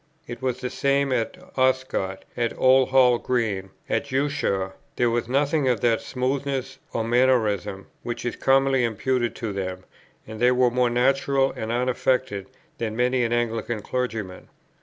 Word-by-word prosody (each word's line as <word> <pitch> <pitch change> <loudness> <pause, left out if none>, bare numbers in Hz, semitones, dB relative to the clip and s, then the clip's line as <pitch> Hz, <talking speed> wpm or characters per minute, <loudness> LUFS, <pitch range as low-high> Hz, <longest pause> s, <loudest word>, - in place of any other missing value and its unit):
It 120 +1 -8
was 130 -1 -1
the 125 - -3
same 140 -1 +1
at 120 +7 -1 0.2
Oscott, 130 -7 0
at 120 -1 -1
Old 130 0 +5
Hall 125 -2 +5
Green, 105 -6 -1 0.2
at - - 0
Ushaw; 135 -9 0 0.2
there 120 -1 +2
was 120 -1 -1
nothing 140 +2 +1
of 120 -5 +1
that 115 -2 +2
smoothness, 135 0 -2
or 115 - -1
mannerism, 110 -5 +1 0.2
which 120 0 -5
is 120 - -2
commonly 135 -1 +3
imputed 120 +1 0
to 110 -3 -4
them, 95 -1 -4 0.4
and 110 0 -9
they 125 +1 +5
were 125 -1 +3
more 125 0 +2
natural 135 +2 +2
and 110 +1 -4
unaffected 125 -4 0 0.3
than 110 -2 -2
many 125 +1 +2
an 115 - -1
Anglican 115 -2 -1
clergyman. 110 -7 -4
125 Hz, 155 wpm, -24 LUFS, 115-130 Hz, 0.4 s, Old